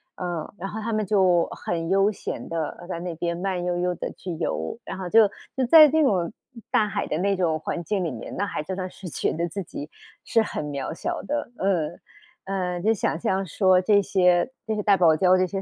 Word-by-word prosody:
呃， 175 -2 -4
然 195 +2 -4
后 220 - -5
它 230 +1 -2
们 215 -1 0
就 185 -4 +3
很 165 -1 -4
悠 195 +2 +4
闲 - - -6
地， 165 - -5 0.2
呃， 175 - -11
在 170 -2 -4
那 175 -1 -4
边 170 +1 -2
慢 180 0 -2
悠 175 0 0
悠 180 0 0
地 - - -4
去 180 - -7
游。 175 - -2
然 - - -6
后 185 -2 -5
就 220 0 +6 0.3
就 260 - +2
在 305 +3 +9
那 315 +1 +3
种 185 -9 +1 0.4
大 220 -5 +3
海 195 - -2
的 155 - -1
那 195 +2 +1
种 165 -4 0
环 170 +2 -4
境 190 -1 -1
里 160 - -2
面， 115 - -7
那 205 - 0
还 155 -6 -4
真 190 +3 -5
的 185 -1 -3
是 180 -1 -9
觉 - - -1
得 170 +2 -1
自 195 +4 -4
己 150 -2 -8 0.3
是 225 - +2
很 155 - -3
渺 140 0 -4
小 - - -3
的， 295 -4 -3
嗯。 175 -4 0 0.5
呃， 180 -2 -2
就 220 +5 +2
想 170 -5 -1
象 190 +2 0
说 185 +1 +3
这 200 +1 +4
些 180 +2 +3 0.2
这 220 - -1
些 210 - -1
大 205 -1 +4
堡 170 -3 +5
礁 185 +2 +4
这 185 - +3
些 195 +1 -4
185 Hz, 250 characters per minute, -25 LUFS, 175-200 Hz, 0.5 s, 在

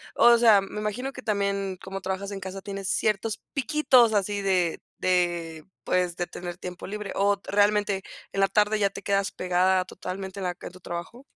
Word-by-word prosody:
O 235 0 +7
sea, 225 -3 +7
me 195 +2 -6
imagino 245 +6 -3
que 260 - -8
también 200 -3 -1
como 195 0 -6
trabajas 190 +1 -3
en 195 -1 -6
casa 190 +1 -6
tienes 195 0 -4
ciertos 215 +1 0
piquitos 265 -4 +4
así 205 0 0
de 185 -4 +1 0.2
de 175 -3 0 0.2
pues 180 -1 +1
de 175 - -1
tener 175 0 -7
tiempo 180 -1 -7
libre, 210 0 -5
¿o 200 0 +2
realmente 205 -1 +2 0.3
en 195 - -2
la 195 - +5
tarde 210 +1 +2
ya 200 -1 +3
te - - -9
quedas 200 0 +1
pegada 185 +1 +2
totalmente 190 +1 -6
en - - -4
la 175 -1 -2
en - - -8
tu 185 - -14
trabajo? 175 +9 -7
195 Hz, 190 wpm, -26 LUFS, 185-210 Hz, 0.3 s, O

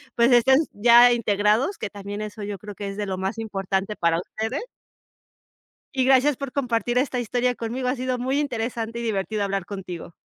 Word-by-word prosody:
pues, 235 +2 +4
estén 265 +3 +6
ya 240 +3 +7
integrados, 215 - +1
que 215 - -4
también 205 +1 -7
eso 215 0 -7
yo 200 -1 -4
creo 205 0 -9
que 200 - -5
es 195 +1 -6
de 205 -1 -3
lo 190 -1 -3
más 190 +4 -3
importante 195 -1 -2
para 170 0 +1
ustedes. 220 - -4 1.3
Y 260 -1 +2
gracias 265 +1 +4
por 275 -2 -6
compartir 245 -3 0
esta 255 -1 0
historia 245 +1 0
conmigo, 250 +3 -3
ha 260 - 0
sido 255 0 -1
muy 260 +3 0
interesante 235 -4 -3
y - - -4
divertido 210 -1 -1
hablar 195 -2 -2
contigo. 185 -4 -7
225 Hz, 185 wpm, -24 LUFS, 200-250 Hz, 1.3 s, ya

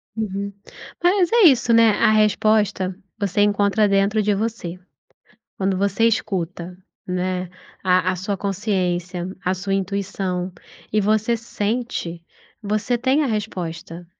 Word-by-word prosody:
Uhum. 200 -2 -3 0.5
Mas 360 -1 +4
é 470 -2 +5
isso, 245 -4 +4
né? 230 -1 +6
A - - +5
resposta 210 -3 +2 0.2
você 200 0 0
encontra 205 +1 +3
dentro 200 +2 +2
de 205 0 +2
você. 200 -4 -3 0.8
Quando 190 -1 0
você 200 +3 +1
escuta, 180 -5 -2 0.3
né, 180 0 -2 0.3
a 185 -1 +3
a - - -4
sua 195 +2 -3
consciência, 180 -3 -2 0.2
a 185 +1 +1
sua 195 +1 -4
intuição 190 -2 -2 0.4
e 215 - +3
você 215 +3 +2
sente, 215 -6 -3 0.4
você 215 +4 0
tem 265 +5 +2
a - - +1
resposta, 175 -6 -4
200 Hz, 125 wpm, -22 LUFS, 185-215 Hz, 0.8 s, né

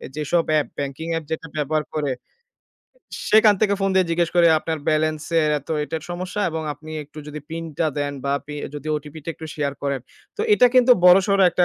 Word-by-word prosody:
যেসব 155 +3 +1
app 155 -1 +2
banking 140 +3 -4
app 165 - -2
যেটা 160 0 -3
ব্যবহার 155 +1 0
করে 145 -3 0 1.2
সেখান 215 -1 +6
থেকে 200 -2 +3
ফোন 195 0 +1
দিয়ে 185 -2 +3
জিজ্ঞেস 170 0 +1
করে 170 -1 +6
"আপনার 160 0 -3
বেলেন্স 155 0 0 0.2
এর 150 - +2
এত 140 - -20 0.2
এটার 160 +1 -5
সমস্যা 180 +3 -4
এবং 160 0 -3
আপনি 155 +2 -12
একটু 150 +2 -14
যদি 150 0 -7
পিনটা 165 -1 -3
দেন 145 0 -1
বা 140 - 0
পি 150 - -7 0.2
যদি 145 +1 -6
ওটিপিটা 150 +1 -9
একটু 160 - -9
শেয়ার 145 -2 -1
করেন।" 140 -2 -1 0.4
তো - - -4
এটা 250 - +6
কিন্তু 250 0 +7
বড়সড় 195 +2 +6
একটা 180 - +3
160 Hz, 190 wpm, -22 LUFS, 150-175 Hz, 1.2 s, কিন্তু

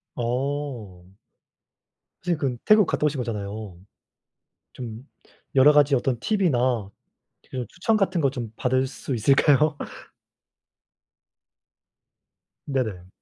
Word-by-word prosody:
어. 120 -7 -3 1.2
선생님 175 -3 0
근 130 -4 -1
태국 215 -2 +6
갔다 150 - 0
오신 145 -3 0
거잖아요. 105 -4 -5 1.0
좀 120 +2 -8 0.5
여러 135 +3 +7
가지 145 -1 +4
어떤 125 -1 0
팁이나 125 - +1 0.6
그 125 -3 -4
추천 220 +5 0
같은 195 -4 +1
것 140 -3 +2
좀 120 -5 -6
받을 130 +1 +1
수 130 0 -5
있을까요? 140 +5 +3 2.9
네네. 110 -10 -2
130 Hz, 185 characters per minute, -24 LUFS, 115-145 Hz, 2.9 s, 여러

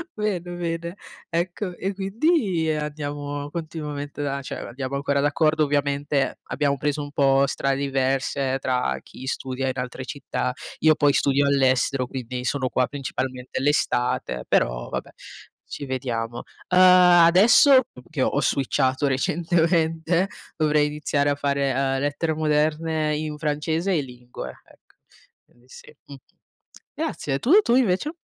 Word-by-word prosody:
bene, 210 -4 -1 0.2
bene. 170 +1 -4 0.3
Ecco, 175 +2 -2
e 195 +3 -3
quindi 195 - 0
andiamo 145 -1 -4
continuamente 150 -3 -5
a 140 0 -2
cioè, 130 - -6
andiamo 130 +2 -5
ancora 140 0 0
d'accordo. 155 +2 +2
Ovviamente 145 0 0
abbiamo 140 -1 -1
preso 150 +1 -1
un 145 0 -7
po' 135 -1 +3
strade 135 0 -1
diverse 135 0 0
tra 125 -1 0
chi 130 - -11
studia 130 0 -3
in 130 - -3
altre 125 +1 -5
città, 140 -3 -3 0.3
io 155 -1 +5
poi 145 -2 +3
studio 140 0 +2
all'estero, 130 -2 +2
quindi 125 -1 -5
sono 130 0 -1
qua 125 +1 +1
principalmente 130 -2 -4
l'estate, 125 - 0
però - - +1
vabbè, - - -5 0.6
ci 145 - -6
vediamo. 120 -3 -3 0.3
Uhm, 180 +1 +4
adesso, 185 - +7 0.3
che 155 -4 -3
ho 140 - +1
switchato 130 0 +1
recentemente 165 +4 +1 0.3
dovrei 150 -1 +2
iniziare 145 -1 0
a - - 0
fare, 140 -1 0
ehm, 135 0 0
lettere 145 +3 -1
moderne 155 0 0
in 150 -1 -4
francese 160 +4 -1
e 155 - +2
lingue, 125 -2 -9
ecco. - - -25 0.5
Quindi 120 +1 -28
sì. - - -14
Mh-mh. 140 - -11 0.8
Grazie, 135 - -3
e - - -2
tu? 255 - 0
Tu 240 - +1
invece? 255 - +1
145 Hz, 135 wpm, -24 LUFS, 135-160 Hz, 0.8 s, adesso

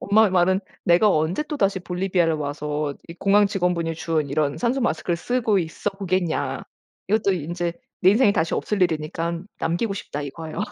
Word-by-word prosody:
엄마의 210 0 +4
말은 185 +1 +3 0.2
내가 175 +5 +5
언제 160 - +1
또다시 200 -11 0
볼리비아를 180 -2 0
와서 150 0 -3
이 165 - -8
공항 200 +3 +4
직원분이 175 -4 0
준 155 -3 -1
이런 145 -1 0
산소마스크를 235 -9 0
쓰고 225 0 +1
있어 165 +5 -3
보겠냐. 185 -4 -1 0.5
이것도 210 -1 +2
인제 170 +1 -3 0.3
내 185 - +7
인생에 210 0 +4
다시 165 -4 0
없을 205 -3 -1
일이니깐 165 +2 -1
남기고 195 +6 0
싶다 150 -7 -5
이거예요. 155 +4 -7
175 Hz, 380 characters per minute, -23 LUFS, 160-200 Hz, 0.5 s, 내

